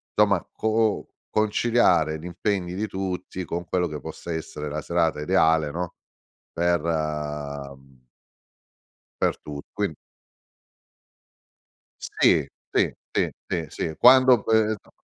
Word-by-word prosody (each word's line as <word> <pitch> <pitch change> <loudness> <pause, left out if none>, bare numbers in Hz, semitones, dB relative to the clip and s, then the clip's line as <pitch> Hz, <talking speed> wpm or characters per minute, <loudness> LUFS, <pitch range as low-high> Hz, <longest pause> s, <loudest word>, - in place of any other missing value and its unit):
somma - - +3
co 110 - -3
o 110 -1 +1 0.2
conciliare 105 -7 +2
gli 80 - -11
impegni 90 0 -2
di 110 +3 -2
tutti 95 -1 -4
con 85 +2 -3
quello 90 +1 0
che 75 -1 -6
possa 85 - -7
essere 75 -2 -5
la 75 +1 -3
serata 85 -1 0
ideale, 80 -3 +3
no, 85 +3 -4 0.6
per, 85 -1 +1
uhm 75 -4 -4 1.2
per - - +2
tu 70 -1 -6 0.2
quin 105 -1 0 2.1
Sì, 415 - +2 0.3
ti, - - +2 0.2
ti, - - +1 0.2
ti 85 -3 -2
sì, - - -4
uhm, 80 - -6
quando 130 -2 +7
questo 110 -2 +1
85 Hz, 120 wpm, -25 LUFS, 75-105 Hz, 2.1 s, quando